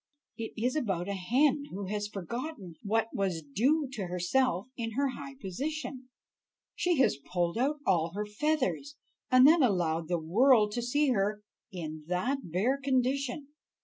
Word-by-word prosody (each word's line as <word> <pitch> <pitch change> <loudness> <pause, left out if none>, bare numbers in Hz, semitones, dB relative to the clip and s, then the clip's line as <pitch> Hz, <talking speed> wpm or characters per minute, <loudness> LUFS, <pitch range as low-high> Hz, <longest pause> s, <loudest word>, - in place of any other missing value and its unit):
It 225 -1 -6
is 245 +5 0
about 195 - -1
a 200 - -2
hen 265 +10 +2
who 200 +1 -5
has 205 +1 -2
forgotten 210 - -6
what 225 +2 0
was 185 -5 -1
due 265 - +1
to 210 -8 -4
herself 180 +3 +1
in 225 -2 -4
her 275 +3 +1
high 275 +1 -8
position; 265 - -5 0.6
she 350 -2 +1
has 260 - +3
pulled 175 -1 0
out 285 +5 0
all 170 -3 +2
her 210 +1 -2
feathers, 290 +4 -1 0.3
and 255 0 +7
then 325 +2 +6
allowed 170 - +1
the 175 0 0
world 210 +7 +4
to 240 - -2
see 285 +5 +1
her 210 -1 0 0.3
in 155 -4 -6
that 185 +11 0
bare 225 - +1
condition." 275 +1 0
225 Hz, 155 wpm, -30 LUFS, 185-275 Hz, 0.6 s, and